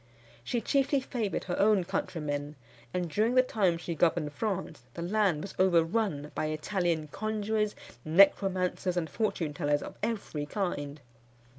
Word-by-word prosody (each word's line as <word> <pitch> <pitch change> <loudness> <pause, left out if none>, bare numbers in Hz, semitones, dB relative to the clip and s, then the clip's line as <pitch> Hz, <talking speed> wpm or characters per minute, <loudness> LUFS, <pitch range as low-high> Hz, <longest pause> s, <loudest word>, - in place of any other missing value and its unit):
She 240 - -1
chiefly 275 +4 +2
favoured 235 -6 -2
her 180 - -3
own 205 -2 +4
countrymen; 150 -4 -3 0.4
and 180 -1 -1
during 215 +9 +1
the 255 - +7
time 195 -9 +1
she 170 0 -4
governed 160 -2 +1
France, 190 - -3
the 170 - -4
land 185 -4 +1
was 195 - -7
overrun 170 -3 +2
by 155 - -1
Italian 160 0 -1
conjurors, 215 +2 -1 0.3
necromancers, 185 +1 +3
and 165 -2 0
fortune 165 -4 -1
tellers 145 -2 0
of - - -8
every 205 -9 -3
kind. 150 -7 -3
180 Hz, 140 wpm, -30 LUFS, 155-210 Hz, 0.4 s, the